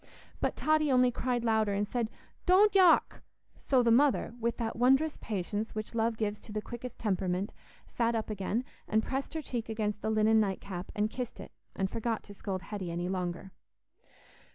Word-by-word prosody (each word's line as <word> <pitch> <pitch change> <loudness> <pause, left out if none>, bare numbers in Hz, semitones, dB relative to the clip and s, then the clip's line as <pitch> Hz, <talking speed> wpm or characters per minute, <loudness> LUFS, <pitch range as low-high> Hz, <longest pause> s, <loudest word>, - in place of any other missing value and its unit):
But - - 0
Totty 310 -2 +2
only 250 -1 +5
cried 245 -1 -1
louder, 220 -2 +2
and 205 +1 0
said, 235 0 -1 0.4
"Don't 395 +3 +6
yock!" 370 -4 +5 0.3
So 260 -3 +2
the 235 - +4
mother, 265 -1 +3
with 235 0 -1
that 225 -2 -2
wondrous 270 +6 +3
patience 210 +2 -3
which 215 +1 -4
love 225 0 +1
gives 210 -1 -1
to 220 - -11
the 215 - -2
quickest 240 +2 -7
temperament, 190 -2 -1 0.3
sat 235 -1 0
up 220 -1 -2
again, 210 +4 -1 0.2
and 220 +1 +2
pressed 270 +6 -3
her 315 - -2
cheek 235 -4 -4
against 210 -2 -2
the - - -1
linen 220 0 +4
night 195 -3 0
cap 185 -2 -7
and 210 0 0
kissed 245 -1 -5
it, - - -9 0.2
and 190 - 0
forgot 225 +2 -2
to 205 - -11
scold 190 -2 -4
Hetty 200 -4 -5
any 175 +1 -2
longer. 180 0 -3
220 Hz, 185 wpm, -31 LUFS, 205-245 Hz, 0.4 s, Don't